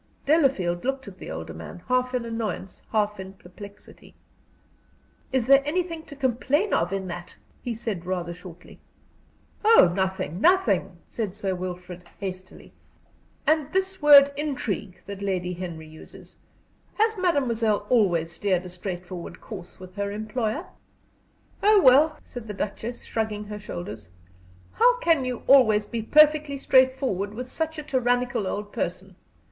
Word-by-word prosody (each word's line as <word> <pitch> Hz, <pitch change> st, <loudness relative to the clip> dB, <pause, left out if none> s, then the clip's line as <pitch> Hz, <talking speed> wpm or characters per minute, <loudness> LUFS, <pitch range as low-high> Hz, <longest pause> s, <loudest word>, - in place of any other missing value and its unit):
Delafield 265 Hz, -, +2 dB
looked 270 Hz, -1 st, -2 dB
at 190 Hz, -2 st, -11 dB
the -, -, -8 dB
older 80 Hz, 0 st, -6 dB
man, 85 Hz, -, -10 dB
half 255 Hz, 0 st, +1 dB
in 245 Hz, -2 st, -1 dB
annoyance, 225 Hz, -4 st, -4 dB
half 210 Hz, -2 st, 0 dB
in 190 Hz, 0 st, -8 dB
perplexity. 200 Hz, +2 st, -14 dB, 1.2 s
"Is 260 Hz, -3 st, +1 dB
there 275 Hz, +2 st, +6 dB
anything 330 Hz, +2 st, -2 dB
to 295 Hz, -, -11 dB
complain 275 Hz, -, 0 dB
of 170 Hz, +2 st, +1 dB
in 195 Hz, -1 st, -3 dB
that?" 175 Hz, +1 st, -8 dB, 0.2 s
he 240 Hz, -2 st, -4 dB
said, 215 Hz, -6 st, -4 dB
rather 175 Hz, -1 st, -3 dB
shortly. 175 Hz, -1 st, -13 dB, 0.8 s
"Oh, 430 Hz, -, +7 dB
nothing, 190 Hz, -2 st, -2 dB
nothing!" 200 Hz, -, +3 dB
said 210 Hz, -5 st, -4 dB
Sir 195 Hz, -3 st, -2 dB
Wilfrid, 180 Hz, -1 st, -7 dB
hastily. 185 Hz, -1 st, -8 dB, 0.7 s
"And 310 Hz, -2 st, +2 dB
this 380 Hz, -1 st, -1 dB
word 285 Hz, -1 st, +8 dB
intrigue 230 Hz, -10 st, -3 dB
that 200 Hz, -1 st, -8 dB
Lady 180 Hz, -2 st, -2 dB
Henry 170 Hz, -3 st, -7 dB
uses? 155 Hz, 0 st, -14 dB, 0.6 s
Has 440 Hz, +1 st, +2 dB
mademoiselle 235 Hz, -, +1 dB
always 175 Hz, -9 st, +2 dB
steered 185 Hz, +1 st, -1 dB
a -, -, -7 dB
straightforward 180 Hz, -1 st, -7 dB
course 185 Hz, -6 st, -10 dB
with 185 Hz, +1 st, -12 dB
her 200 Hz, 0 st, -2 dB
employer?" 220 Hz, -, -3 dB, 1.0 s
"Oh, 420 Hz, 0 st, +6 dB
well," 300 Hz, +1 st, +5 dB
said 240 Hz, -3 st, -9 dB
the 210 Hz, -, -6 dB
Duchess, 220 Hz, +4 st, -5 dB
shrugging 215 Hz, -2 st, -3 dB
her 210 Hz, 0 st, -7 dB
shoulders, 105 Hz, -, -7 dB, 0.6 s
"how -, -, +4 dB
can 330 Hz, -, +2 dB
you 250 Hz, -2 st, -4 dB
always 220 Hz, -6 st, +5 dB
be 230 Hz, +2 st, -4 dB
perfectly 300 Hz, +3 st, +4 dB
straightforward 260 Hz, -7 st, +2 dB
with 250 Hz, +2 st, -5 dB
such 320 Hz, +4 st, -2 dB
a 305 Hz, -, -5 dB
tyrannical 245 Hz, -5 st, 0 dB
old 205 Hz, +2 st, -4 dB
person! 185 Hz, +2 st, -4 dB
215 Hz, 140 wpm, -25 LUFS, 185-270 Hz, 1.2 s, word